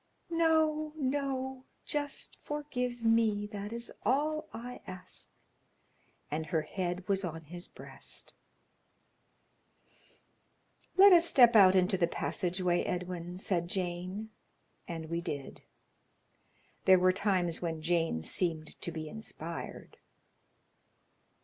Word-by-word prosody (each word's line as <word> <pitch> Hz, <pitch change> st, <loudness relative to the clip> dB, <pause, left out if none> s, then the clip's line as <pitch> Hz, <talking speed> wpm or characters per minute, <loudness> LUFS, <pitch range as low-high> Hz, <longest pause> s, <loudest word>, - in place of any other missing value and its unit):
"No, 315 Hz, -2 st, +2 dB
no; 265 Hz, -2 st, -2 dB, 0.2 s
just 290 Hz, -1 st, -3 dB
forgive 250 Hz, -5 st, -3 dB
me; 225 Hz, -2 st, +3 dB
that 205 Hz, 0 st, -6 dB
is 235 Hz, 0 st, -5 dB
all 305 Hz, +6 st, +1 dB
I 245 Hz, +2 st, -7 dB
ask," 185 Hz, 0 st, -5 dB, 1.0 s
and 155 Hz, +1 st, -2 dB
her 160 Hz, -2 st, 0 dB
head 180 Hz, +2 st, -3 dB
was 195 Hz, 0 st, +1 dB
on 165 Hz, -2 st, -4 dB
his 175 Hz, +3 st, -7 dB
breast. -, -, -9 dB, 2.6 s
"Let 390 Hz, 0 st, +10 dB
us 345 Hz, 0 st, +6 dB
step 240 Hz, -3 st, +7 dB
out 190 Hz, -3 st, +8 dB
into 185 Hz, 0 st, +3 dB
the 170 Hz, -, +4 dB
passage 175 Hz, +4 st, -1 dB
way, 175 Hz, -1 st, +2 dB
Edwin," 180 Hz, -1 st, -4 dB
said 180 Hz, -3 st, 0 dB
Jane, 185 Hz, +4 st, -3 dB, 0.6 s
and 165 Hz, -2 st, -5 dB
we 170 Hz, +1 st, -2 dB
did. 140 Hz, -5 st, -5 dB, 1.2 s
There 190 Hz, 0 st, +8 dB
were 185 Hz, 0 st, +4 dB
times 185 Hz, -4 st, +1 dB
when 165 Hz, -2 st, -3 dB
Jane 165 Hz, -, +1 dB
seemed 160 Hz, -, -2 dB
to 170 Hz, -, -3 dB
be 160 Hz, -1 st, -5 dB
inspired. 170 Hz, -4 st, -7 dB
190 Hz, 110 wpm, -32 LUFS, 175-250 Hz, 2.6 s, Let